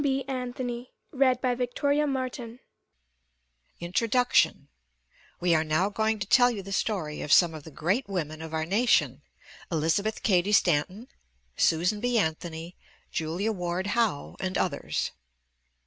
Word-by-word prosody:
SOME 270 -1 +1
WOMEN 250 -1 -4 0.3
OF 255 -2 +2
HISTORY 285 +4 0 1.8
INTRODUCTION: 230 +8 +2 0.7
We 175 -1 +2
are 160 -1 +3
now 160 +5 +1
going 220 +1 0
to 195 - -3
tell 245 +5 +5
you 210 -5 -4
the 195 - -9
story 185 -7 -2
of 145 - -4
some 170 0 +6
of 155 -2 -8
the 160 - -10
great 190 - -1
women 160 -5 -3
of 160 -1 -7
our 160 0 -1
nation, 160 - +2 0.5
Elizabeth 165 +7 0
Cady 195 -1 +2
Stanton, 185 - +2 0.5
Susan 180 +6 +2
B. 245 +1 +1
Anthony, 165 -2 -2 0.4
Julia 170 +7 -1
Ward 180 -2 -3
Howe, 225 -11 0
and 190 0 -2
others. 155 -6 -1
190 Hz, 130 wpm, -27 LUFS, 160-240 Hz, 1.8 s, some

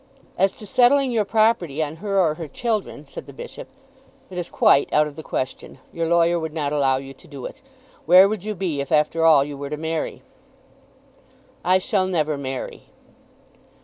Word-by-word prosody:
"As 195 0 +2
to 215 - -11
settling 255 +5 +3
your 220 -3 +1
property 195 -9 +1
on 155 +1 -6
her 195 +2 -1
or 165 -5 +3
her 160 0 -7
children," 220 - -3
said - - -10
the - - -11
Bishop, 480 0 -9 0.6
"it 180 - -4
is 175 - -5
quite 140 - +3
out 150 - +4
of 150 -1 -8
the 160 - -7
question. 130 -4 -5 0.2
Your 165 -1 -2
lawyer 170 0 +3
would 160 -1 -5
not 150 -2 -2
allow 135 -3 +2
you 135 0 -8
to - - -19
do 140 -4 -9
it. - - -9 0.5
Where 185 +3 +8
would 210 -2 -4
you 215 0 -4
be 170 -7 -2
if 140 - -7
after 155 +2 +2
all 150 -4 +6
you 145 0 -7
were 140 0 -6
to 150 - -4
marry?" 160 +1 -4 1.4
"I 185 +1 +4
shall 190 -1 0
never 155 -5 0
marry." 135 -2 -6
165 Hz, 190 wpm, -22 LUFS, 145-195 Hz, 1.4 s, Where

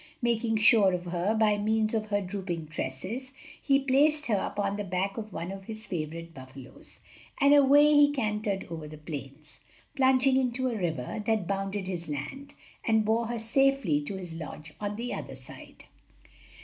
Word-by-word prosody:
Making 230 -1 +1
sure 215 -3 +5
of 180 0 -3
her 175 +5 0
by 215 -2 +3
means 220 +1 +1
of 215 -1 -1
her 205 -1 0
drooping 180 -5 -5
tresses, 195 - -4 0.3
he 275 -1 +3
placed 285 +3 +3
her 220 -6 +1
upon 200 0 -2
the 205 - -3
back 190 +1 -2
of 215 -1 -6
one 170 +1 -5
of 195 0 -8
his 220 0 -6
favorite 165 -1 -5
buffalos, 130 -2 -12 0.4
and 280 0 +6
away 285 +1 +7
he 290 0 +6
cantered 210 -6 -2
over 160 -2 -6
the 155 +1 -10
plains. 150 -1 -9 0.4
Plunging 260 0 +4
into 255 0 0
a 235 - -3
river 170 - -3
that 220 -4 +1
bounded 195 +1 -2
his 175 -3 -4
land, 150 - -6 0.3
he 225 - 0
bore 220 +1 +2
her 240 0 -3
safely 225 - +2
to 150 +7 -5
his 180 -3 -7
lodge 155 -1 -8
on 205 0 -3
the 240 +3 -4
other - - -6
side. - - -11
205 Hz, 175 wpm, -28 LUFS, 170-235 Hz, 0.4 s, away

